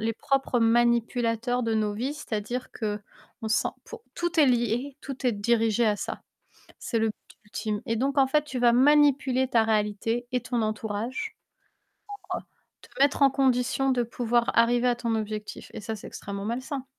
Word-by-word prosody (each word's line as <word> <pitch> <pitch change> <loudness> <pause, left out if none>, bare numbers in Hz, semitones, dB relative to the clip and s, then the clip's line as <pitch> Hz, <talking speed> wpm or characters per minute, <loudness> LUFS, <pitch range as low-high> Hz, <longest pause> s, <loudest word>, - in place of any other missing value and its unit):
les 225 +1 0
propres 265 0 0
manipulateurs 235 +1 +2
de 225 -1 0
nos 210 -1 0
vies. 260 +7 -2
C'est-à-dire 240 -2 -4
qu'on 215 0 -6
sent 220 - +2 0.2
pour 460 -1 -10
tout 345 -1 -2
est 290 - +6
lié, 245 +3 0
tout 270 -2 -5
est 240 - +3
dirigé 225 +2 +2
à 210 -1 +2
ça. - - -5 0.6
C'est 230 - -2
le 225 - +2
but 215 - -4 0.3
ultime 210 0 -4
et 230 - 0
donc 275 +4 0
en 270 - +6
fait, 300 +2 +2
tu 270 -4 -5
vas 240 -1 +5
manipuler 265 -1 +4
ta 230 -3 +3
réalité 220 +2 0
et 250 - +1
ton 235 0 -2
entourage, 215 +3 -3 1.5
pour, - - -17
heu, - - -23
te - - +4
mettre 285 0 +3
en 275 - +7
condition 265 0 +1
de 245 -2 +2
pouvoir 235 0 0
arriver 240 +1 +4
à 245 - +3
ton 235 -2 -1
objectif 215 -1 -5
et - - -5
ça, 220 +1 -4
c'est - - -10
extrêmement 200 0 -6
malsain. 255 +4 -3
235 Hz, 180 wpm, -27 LUFS, 220-260 Hz, 1.5 s, en